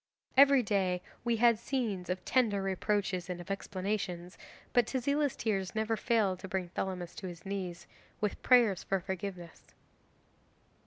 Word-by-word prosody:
Every 275 -1 +7
day 190 -4 0 0.2
we 235 -1 +1
had 230 -1 +4
scenes 225 -8 -2
of 180 0 -3
tender 215 -6 +2
reproaches 195 -1 -1
and 180 -1 -3
of 175 +3 -7
explanations, 190 -2 -3 0.4
but 245 -2 +4
Tezila's 280 +2 0
tears 195 -4 -1
never 220 +1 +1
failed 215 -5 +1
to 190 - -7
bring 185 -2 -2
Thelamis 180 -1 -4
to 190 - -5
his 175 0 -9
knees, 185 -3 -4 0.3
with 210 -2 -2
prayers 235 -7 +5
for 195 - 0
forgiveness. 185 -2 -6
195 Hz, 145 wpm, -32 LUFS, 185-230 Hz, 0.4 s, Every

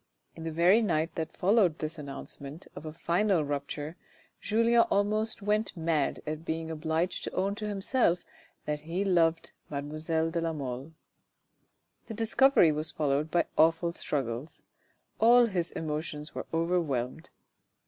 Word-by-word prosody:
In 165 - -8
the 165 - -2
very 175 +7 +5
night 165 -5 0
that 160 -1 -3
followed 190 -4 +3
this 155 +1 -4
announcement 140 +2 -7
of 150 - -8
a - - -5
final 170 +1 +1
rupture, 145 +3 -4 0.4
Julien 230 +2 +4
almost 215 +2 +1
went 210 -1 0
mad 160 -3 0
at 155 +1 -4
being 160 0 -3
obliged 160 +3 -1
to - - -4
own 195 +1 +1
to 210 +1 -5
himself 195 -2 +1 0.4
that 150 0 -2
he 170 +6 -3
loved 165 -3 +2 0.2
mademoiselle 155 +3 -2
de 170 0 -1
la 165 -1 -1
Mole. 135 +1 -5 1.1
This 220 - -7
discovery 225 - +5
was 155 +1 -1
followed 150 0 0
by 170 +2 +2
awful 165 +2 +4
struggles: 135 -4 -4 0.6
all 240 +2 +7
his 180 -6 -1
emotions 150 -1 -4
were - - -5
overwhelmed. 165 -4 -1
165 Hz, 140 wpm, -29 LUFS, 155-190 Hz, 1.1 s, all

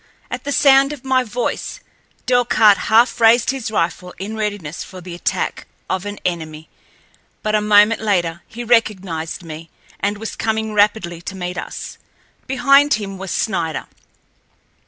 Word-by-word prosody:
At 250 +1 -5
the 285 - -2
sound 275 +1 +5
of 270 -3 -11
my 260 -1 +2
voice, 240 +1 -3 0.5
Delcarte 230 -5 +4
half 230 +2 +4
raised 230 +2 +5
his 265 -5 -4
rifle 180 -2 -2
in 205 +3 -5
readiness 205 -8 -4
for 185 - -11
the 180 0 -9
attack 175 - -2 0.2
of 190 +1 -2
an 205 0 -5
enemy, 160 -3 -4 0.7
but 215 - -1
a 215 - +3
moment 210 +1 +5
later 175 -5 0
he 240 +2 -7
recognized 190 -8 0
me, 165 0 -9 0.3
and 205 +1 -1
was 225 +1 -6
coming 220 -1 -1
rapidly 205 -5 +1
to 190 - -7
meet 180 -1 -4
us. - - -7 0.5
Behind 275 +3 +4
him 195 -3 -6
was 195 0 -6
Snider. 170 -8 -1
210 Hz, 150 wpm, -19 LUFS, 180-235 Hz, 0.7 s, sound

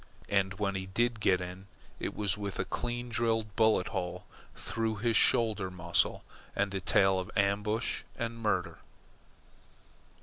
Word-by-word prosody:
And 95 -1 +1
when 100 0 -1
he 95 -1 -4
did 115 +4 0
get 95 -3 +3
in, 90 +2 -7 0.3
it - - -3
was 105 -1 0
with 100 -1 -5
a - - -1
clean 120 0 -3
drilled 115 -3 0
bullet 110 -4 +3
hole 90 -2 -4 0.3
through 115 -1 -2
his 115 +2 0
shoulder 110 -7 +4
muscle, 85 -1 +1 0.3
and 100 -1 0
a 95 - -1
tale 95 +1 +3
of 90 - -5
ambush 105 +3 +1 0.2
and 115 0 -3
murder. 105 -5 -1
100 Hz, 145 wpm, -31 LUFS, 95-115 Hz, 0.3 s, shoulder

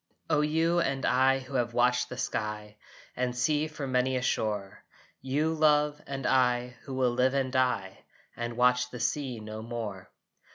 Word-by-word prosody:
O 150 -1 +4
you 165 +3 +2
and 135 -5 0
I 130 +1 +4
who 135 +1 -10
have 120 -2 -1
watched 125 0 +2
the 125 - -7
sky 105 -3 -3 0.4
And 125 0 -2
sea 150 +4 +1
from 145 -4 -6
many 130 +1 +2
a 130 - 0
shore! 105 -5 -2 0.4
You, 145 +5 0
love, 150 -1 +3
and 135 -1 -5
I 125 -1 +2
who 135 - -5
will 130 -2 +2
live 130 +2 +2
and 135 -2 0
die 125 -7 0 0.4
And 120 0 -4
watch 125 0 +3
the 125 - -8
sea 125 +1 -1
no 110 0 -7
more! 110 -5 -6
125 Hz, 170 wpm, -29 LUFS, 120-135 Hz, 0.4 s, O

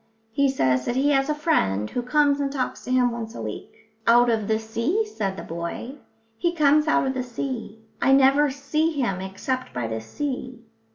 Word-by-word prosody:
"He 280 +4 +2
says 130 - +1
that 240 - -1
he 280 +3 +2
has 270 0 +2
a 300 - +1
friend 105 - +1
who 245 - -3
comes 285 +3 +2
and 280 -1 -1
talks 270 -2 -3
to - - -4
him 250 -1 +3
once 230 -1 -6
a - - -6
week." - - -6 0.4
"Out 240 +1 +6
of 220 -3 -1
the 220 - +2
sea," 230 - -1
said 200 - -3
the - - -6
boy. 170 +9 -5 0.5
"He 345 0 0
comes 300 0 +4
out 315 - +3
of 265 - 0
the 260 - -2
sea. 240 -3 -5 0.2
I 270 - +4
never 275 +2 +5
see 300 +4 -1
him 240 -10 -1
except 225 +7 -4
by 120 -1 -2
the 110 0 -3
sea." 255 - -5
255 Hz, 205 wpm, -24 LUFS, 220-285 Hz, 0.5 s, Out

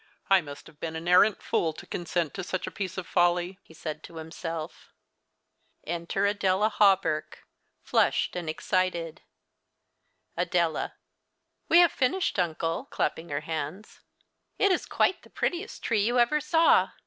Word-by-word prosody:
" - - -36
I 195 -1 +7
must 145 -3 -10
have 150 - -17
been 160 -1 -4
an 160 +2 -6
arrant 185 +3 +5
fool 160 -1 0
to - - -11
consent 170 -2 -2
to 190 - -5
such 185 +1 -3
a - - -6
piece 190 -2 -5
of 185 - -4
folly," 175 +2 +1
he 160 - -18
said 155 -1 -6
to 170 - -13
himself. 160 0 -6 1.0
Enter 170 +4 -1
Adela 200 0 +2
Hawberk, 190 -7 +2 0.4
flushed - - +1
and 175 -3 -3
excited. 170 0 -1 1.1
Adela. - - 0 0.7
AVe 345 - +8
have 345 -3 +5
finished, 265 - 0
uncle 165 -1 -1
(clapping 165 +1 -2
her 145 +1 -2
hands). 160 +6 -5 0.6
It 395 - +3
is 365 - 0
quite 375 - +1
the - - -18
prettiest 360 +5 -3
tree 220 -4 +1
you 240 +4 +1
ever 245 +6 +3
saw. 325 +2 +4
180 Hz, 150 wpm, -27 LUFS, 160-210 Hz, 1.1 s, AVe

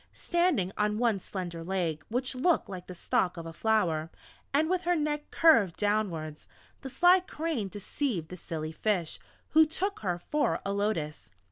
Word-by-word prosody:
Standing 345 - +1
on 210 0 +1
one 230 -4 +2
slender 175 -3 -6
leg 170 -4 -2
which 250 +3 -1
looked 315 +7 +2
like 185 -2 -8
the 180 - -8
stalk 180 +1 0
of 165 - -6
a 165 - -7
flower, 170 -7 +1 0.4
and 300 +3 +2
with 365 +1 +1
her 355 0 +3
neck 295 -1 -2
curved 230 - +5
downwards, 185 -8 -1 0.3
the 270 - -6
sly 355 +7 +5
Crane 320 - -3
deceived 200 - -3
the 180 - -8
silly 160 -2 -5
Fish, 180 -2 -1 0.3
who 315 +1 +7
took 385 +6 -1
her 180 -4 -1
for 300 0 +1
a 200 - -1
Lotus. 165 - -2
205 Hz, 165 wpm, -29 LUFS, -, 0.4 s, who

